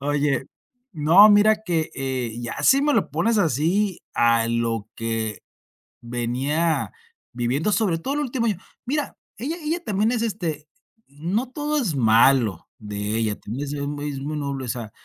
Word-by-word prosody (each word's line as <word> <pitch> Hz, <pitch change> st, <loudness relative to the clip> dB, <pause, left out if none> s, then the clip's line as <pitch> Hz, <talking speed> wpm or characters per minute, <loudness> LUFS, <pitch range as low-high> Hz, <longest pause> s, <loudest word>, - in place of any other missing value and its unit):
Oye 145 Hz, -1 st, 0 dB, 0.5 s
No, 170 Hz, +7 st, +7 dB
mira 210 Hz, +1 st, +6 dB
que, 165 Hz, -4 st, -1 dB
eh, 130 Hz, -4 st, -3 dB
ya 120 Hz, -, -5 dB
si 275 Hz, +1 st, +5 dB
me 295 Hz, 0 st, +2 dB
lo -, -, +1 dB
pones 230 Hz, -1 st, +1 dB
así, 175 Hz, -, +1 dB
a 115 Hz, -1 st, +3 dB
lo 115 Hz, -2 st, -1 dB
que 115 Hz, -2 st, -3 dB, 0.6 s
venía 130 Hz, +7 st, -1 dB, 0.4 s
viviendo 125 Hz, -, 0 dB
sobre 195 Hz, -6 st, +1 dB
todo 275 Hz, -, -3 dB
el 295 Hz, -, 0 dB
último 250 Hz, -4 st, -1 dB
año. 210 Hz, -5 st, 0 dB, 0.3 s
Mira, 290 Hz, +3 st, -2 dB, 0.2 s
ella 290 Hz, +9 st, -3 dB
ella 335 Hz, +3 st, -2 dB
también 210 Hz, -, +1 dB
es 240 Hz, -2 st, 0 dB
este 170 Hz, -9 st, -3 dB, 0.4 s
no 180 Hz, -, -3 dB
todo 300 Hz, +1 st, -2 dB
es 175 Hz, -, -1 dB
malo 115 Hz, -, +3 dB
de 105 Hz, 0 st, -4 dB
ella, 110 Hz, -2 st, 0 dB
también 130 Hz, +7 st, -5 dB
ha -, -, -6 dB
sido 145 Hz, 0 st, -3 dB
mu 145 Hz, 0 st, -5 dB
es 145 Hz, -2 st, -4 dB
muy 150 Hz, +2 st, -4 dB
noble, 140 Hz, -2 st, -3 dB
o -, -, -7 dB
sea, 115 Hz, -4 st, -4 dB
145 Hz, 165 wpm, -23 LUFS, -, 0.6 s, No